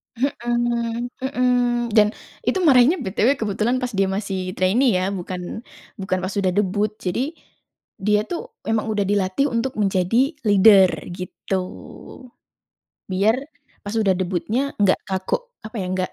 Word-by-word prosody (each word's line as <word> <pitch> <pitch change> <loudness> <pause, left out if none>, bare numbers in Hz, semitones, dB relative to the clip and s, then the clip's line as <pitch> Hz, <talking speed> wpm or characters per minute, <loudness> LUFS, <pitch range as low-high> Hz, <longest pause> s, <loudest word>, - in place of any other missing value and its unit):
Mhm 240 -2 -1
mhm, 250 -2 +1 0.4
dan 210 -2 +6 0.4
itu - - +2
marahnya 275 +1 +6
BTW 215 +7 +2
kebetulan 215 +3 0
pas 250 - -2
dia 195 0 +2
masih 190 -2 -3
trainee 210 +4 +3
ya, 185 - 0
bukan 180 +2 -5 0.4
bukan 190 -1 -1
pas 185 - -3
udah 190 -2 +2
debut 205 +1 +1
jadi, 255 - -2 0.7
dia 210 +1 +3
tuh 345 - -5 0.2
emang 225 0 0
udah 205 -2 0
dilatih 200 +6 +1
untuk 235 +3 -1
menjadi 200 - +2
leader 200 -2 +7 0.2
gitu, 185 +1 -4 1.5
biar, 200 +5 +2 0.5
pas 205 - -5
udah 195 -3 +3
debutnya 185 +6 -1 0.2
nggak 200 -2 +4
kaku 190 -1 0 0.3
apa 220 +2 -8
ya 185 - -3
enggak, 185 0 -2
210 Hz, 135 wpm, -22 LUFS, 190-240 Hz, 1.5 s, leader